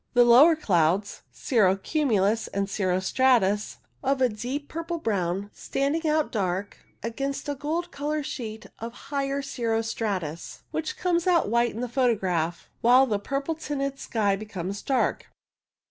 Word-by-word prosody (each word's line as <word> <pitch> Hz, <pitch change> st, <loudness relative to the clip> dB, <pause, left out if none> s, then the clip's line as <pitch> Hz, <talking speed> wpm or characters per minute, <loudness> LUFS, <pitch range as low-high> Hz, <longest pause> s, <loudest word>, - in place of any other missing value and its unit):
The 245 Hz, -, +7 dB
lower 270 Hz, +8 st, +8 dB
clouds, 190 Hz, -, +1 dB
cirro 205 Hz, -7 st, +2 dB
cumulus 225 Hz, -4 st, +1 dB
and 200 Hz, 0 st, -2 dB
cirro 185 Hz, -2 st, 0 dB
stratus, 210 Hz, -1 st, +2 dB, 0.3 s
of 270 Hz, 0 st, +1 dB
a 255 Hz, -1 st, +4 dB
deep 250 Hz, +7 st, -4 dB
purple 335 Hz, +1 st, -4 dB
brown, 200 Hz, -, -1 dB
standing 295 Hz, +4 st, -1 dB
out 305 Hz, 0 st, +1 dB
dark 195 Hz, -1 st, -2 dB, 0.3 s
against 275 Hz, +6 st, -3 dB
a 290 Hz, -, 0 dB
gold 305 Hz, +5 st, -3 dB
coloured 295 Hz, +1 st, -2 dB
sheet 220 Hz, -5 st, -6 dB
of 230 Hz, +1 st, -6 dB, 0.2 s
higher 275 Hz, 0 st, -1 dB
cirro 230 Hz, -4 st, -1 dB
stratus, 190 Hz, -8 st, -4 dB
which 320 Hz, -1 st, -3 dB
comes 345 Hz, -1 st, 0 dB
out 345 Hz, -, +3 dB
white 235 Hz, 0 st, +2 dB
in 230 Hz, -, -4 dB
the 250 Hz, -, -1 dB
photograph, 190 Hz, -10 st, 0 dB
while 250 Hz, +3 st, +6 dB
the 210 Hz, -5 st, -1 dB
purple 275 Hz, +8 st, -2 dB
tinted 275 Hz, -3 st, -3 dB
sky 205 Hz, -4 st, 0 dB
comes 200 Hz, -1 st, -5 dB
dark. 265 Hz, -2 st, 0 dB
235 Hz, 145 wpm, -26 LUFS, 200-280 Hz, 0.3 s, lower